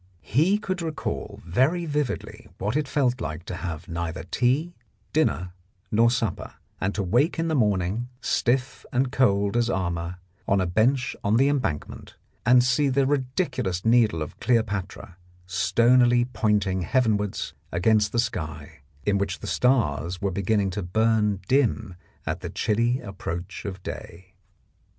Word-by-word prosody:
He 165 - +3
could 185 -4 -3
recall 160 -2 -4
very 130 - +2
vividly 150 -4 -3
what 105 +5 -2
it 150 -2 0
felt 130 -3 +1
like 80 +3 -5
to 90 - -5
have 85 -3 -5
neither 85 -1 -4
tea, 130 - 0 0.4
dinner 90 - +1 0.4
nor 115 +2 +5
supper, 115 -6 -2 0.2
and 100 +2 -1
to 100 - 0
wake 120 - +2
in 165 0 0
the - - 0
morning, 105 - +1
stiff 130 +2 0
and 130 -1 +1
cold 100 -6 +2
as 120 0 +2
armour, 85 -3 -2 0.3
on 100 - +3
a 95 - +1
bench 125 +9 +1
on 105 +3 +3
the 135 +3 +4
Embankment 130 - -3 0.3
and 125 0 +7
see 130 +3 +2
the 135 +1 +2
ridiculous 130 - -1
needle 110 -8 +4
of 75 - -10
Cleopatra 100 -6 -1 0.3
stonily 120 +5 +4
pointing 105 -5 0
heavenwards 105 -1 0 0.2
against 105 +4 +2
the - - -2
sky, 80 - -3 0.2
in 100 -1 +2
which 95 -2 -1
the - - -9
stars 90 - +1
were 100 -1 -1
beginning 100 +1 +1
to 105 +2 -3
burn 105 +1 +1
dim 125 -8 +1 0.3
at - - -2
the - - -6
chilly 115 +4 +1
approach 95 -1 -6
of 95 -2 -6
day. 90 +2 -8
110 Hz, 145 wpm, -25 LUFS, 95-125 Hz, 0.4 s, and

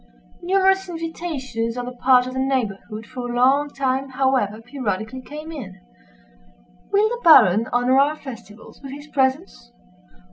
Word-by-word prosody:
Numerous 385 +1 +2
invitations 300 -9 -4
on 245 - -3
the 250 - -6
part 250 0 +3
of 255 - -6
the 260 - -3
neighborhood 230 -5 -2
for 245 0 -7
a - - -4
long 270 +4 +3
time, 270 -1 -2
however, 260 -5 0
periodically 235 -1 -4
came 300 +4 -9
in. 200 -12 -8 1.1
"Will 410 +2 +4
the 480 +2 -4
Baron 225 - +6
honor 245 +2 +3
our 290 +2 +3
festivals 230 -7 -12
with 270 -1 -8
his 290 +1 -9
presence?" 260 - -2
260 Hz, 145 wpm, -22 LUFS, 235-290 Hz, 1.1 s, Baron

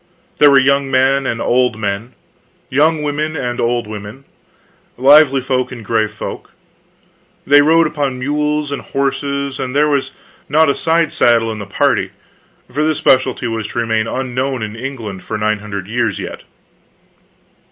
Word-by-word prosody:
There 145 - +7
were 140 - +6
young 140 +1 +2
men 135 +1 +2
and 115 - -2
old 125 -2 +1
men, 105 +2 -4 0.6
young 155 +3 +2
women 150 +2 -2
and 125 -4 -3
old 120 0 0
women, 105 +5 -9 0.7
lively 140 +1 +5
folk 130 0 -1
and 115 -4 -9
grave 110 0 0
folk. 105 - -8 0.9
They 145 +1 +6
rode 165 +3 +4
upon 145 -4 -2
mules 150 +2 -1
and 140 - -3
horses, 140 0 -2
and 130 0 -4
there 150 +1 +4
was 140 -2 0 0.4
not 155 +1 +4
a - - 0
side 165 +1 0
saddle 115 -1 +3
in 110 - -6
the 100 - -7
party; 100 - +1 0.6
for 140 +5 -2
this 155 -1 +1
specialty 130 -1 +2
was 115 -2 -3
to - - -9
remain 110 -1 0
unknown 130 -1 -2
in 105 0 -6
England 115 -6 -6
for 110 - -4
nine 105 0 0
hundred 100 -2 -6
years 115 -2 -1
yet. - - -7
130 Hz, 160 wpm, -16 LUFS, 115-145 Hz, 0.9 s, There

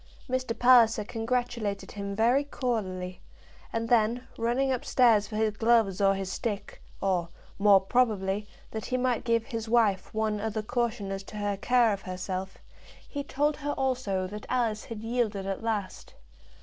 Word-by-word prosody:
Mr. 255 -3 -2
Palliser 240 -4 +6
congratulated 225 -2 -2
him 200 -1 -5
very 240 +6 +3
cordially, 190 -10 -3 0.5
and 230 0 -2
then, 235 +1 +2
running 245 +4 +1
up 255 - -1
stairs 225 -5 +4
for 215 - -7
his 215 -1 +1
gloves 220 -3 +3
or 195 0 +4
his 190 -1 -4
stick, 210 -1 -4 0.2
or, 180 -3 0 0.3
more 200 -1 +7
probably, 205 -2 +1 0.2
that 220 -1 -5
he 255 - 0
might 250 -2 0
give 230 -2 +1
his 225 -1 -5
wife 215 -5 +2
one 215 -1 -1
other 220 0 -2
caution 235 -3 -2
as 195 0 -3
to 205 +2 -10
her 205 -1 -1
care 235 +2 +3
of 195 - -5
herself, 185 +1 -5 0.5
he 285 -1 -4
told 290 +2 0
her 290 0 -2
also 250 -8 -1
that 210 +3 -7
Alice 230 -4 0
had 225 -2 -7
yielded 225 -4 -1
at 195 0 -3
last. 215 -4 -4
220 Hz, 160 wpm, -28 LUFS, 200-245 Hz, 0.5 s, more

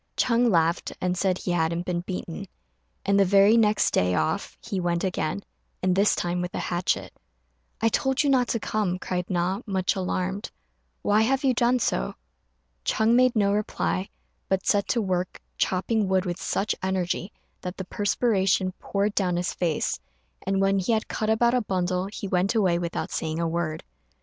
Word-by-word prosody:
Ch'êng 240 0 +3
laughed, 170 -2 +1
and 180 0 0
said 185 0 +1
he 180 - -3
hadn't 170 0 0
been 175 -1 -1
beaten; 180 -2 -6 0.6
and 200 0 +3
the - - +7
very 200 +3 +5
next 215 -2 +3
day 90 0 +2
off 80 -2 -1
he 195 - -4
went 170 -1 0
again, 155 - -2 0.4
and 185 -1 +2
this 200 +2 +4
time 175 0 -1
with 180 0 -4
a - - -1
hatchet. 175 0 -1 0.7
"I 225 - +4
told 265 +5 +1
you 285 - +2
not 250 -2 +3
to 230 - 0
come," 205 -4 -1
cried 180 -1 -3
Na, 185 +3 0
much 190 -2 0
alarmed; 190 +1 -2 0.5
"why 210 +1 +3
have 265 +5 +1
you 265 -2 +3
done 240 +1 +3
so?" 65 - -1 0.7
Ch'êng 220 - +2
made 255 0 +4
no 200 -2 +3
reply, 95 - -1 0.4
but 190 0 0
set 200 -1 +2
to 240 - +1
work 185 -1 -2 0.2
chopping 200 +3 +1
wood 190 0 +1
with 175 0 -4
such 210 +2 0
energy 190 0 -1 0.3
that 180 +1 -6
the 190 - -5
perspiration 195 -2 +1
poured 200 +1 -1
down 180 -4 +1
his 175 +1 -1
face; 165 -4 -1 0.5
and 195 0 +1
when 195 0 +3
he 190 +5 +1
had 220 - 0
cut 215 - -2
about 235 +2 +3
a 250 - +3
bundle 185 -2 -1
he 200 0 -6
went 185 +4 +1
away 185 -6 +3
without 170 -1 -3
saying 160 0 -2
a 170 - 0
word. 165 -1 -2
190 Hz, 180 wpm, -26 LUFS, 175-215 Hz, 0.7 s, the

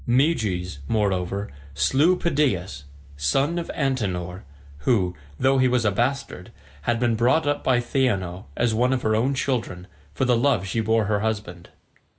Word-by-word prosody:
Meges, 110 - +1
moreover, 100 -2 -1 0.2
slew 140 - +3
Pedaeus, 100 - -1 0.3
son 135 - +1
of 170 - -6
Antenor, 95 - -2 0.4
who, 90 - +1 0.2
though 135 0 +3
he 130 - +4
was 125 -2 +1
a 105 - +3
bastard, 120 -3 -2 0.3
had 120 +5 0
been 120 -1 +2
brought 125 +8 +2
up 145 0 -1
by 125 -2 +3
Theano 105 -8 -1
as 120 -2 +1
one 125 +4 +2
of 125 - -2
her 110 0 +2
own 130 +5 +1
children, 115 -10 -2 0.3
for 135 - +1
the 125 -1 +3
love 120 -5 +2
she 105 +4 -2
bore 110 0 +2
her 105 0 +1
husband. 100 -5 -4
115 Hz, 160 wpm, -24 LUFS, 95-130 Hz, 0.4 s, he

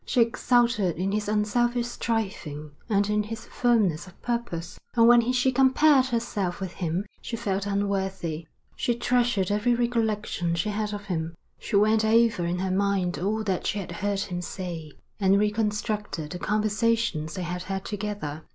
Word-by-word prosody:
She 255 - 0
exulted 235 -4 +2
in 185 +4 -1
his 210 0 -1
unselfish 235 +3 +1
striving 190 -11 -3 0.2
and 205 -1 +2
in 210 0 +1
his 225 +2 -6
firmness 210 -10 +1
of 185 - -16
purpose, 235 -9 -3 0.2
and 230 -1 +6
when 240 0 +6
she 255 +1 +2
compared 265 +1 +5
herself 230 -7 -2
with 190 -2 -4
him 175 +2 -2 0.2
she 230 - -4
felt 200 -2 -2
unworthy. 190 -5 -2 0.3
She 240 - 0
treasured 240 -5 +1
every 220 +4 +2
recollection 220 -7 0
she 170 +5 -1
had 210 0 -2
of 205 -1 -6
him. 165 -4 -3 0.2
She 215 - -3
went 215 +2 +4
over 225 -5 +3
in 175 +1 -1
her 190 +1 -1
mind 190 -4 +1
all 210 +5 -1
that 190 -4 -1
she - - -1
had 195 - -5
heard 205 -1 -1
him 180 -2 -3
say, 170 -4 -6 0.3
and 195 -1 +4
reconstructed 210 -5 -1
the 180 - -5
conversations 215 -6 0
they 185 - -3
had 180 +1 -3
had 190 +1 -4
together. 205 -8 -4
205 Hz, 165 wpm, -26 LUFS, 185-230 Hz, 0.3 s, and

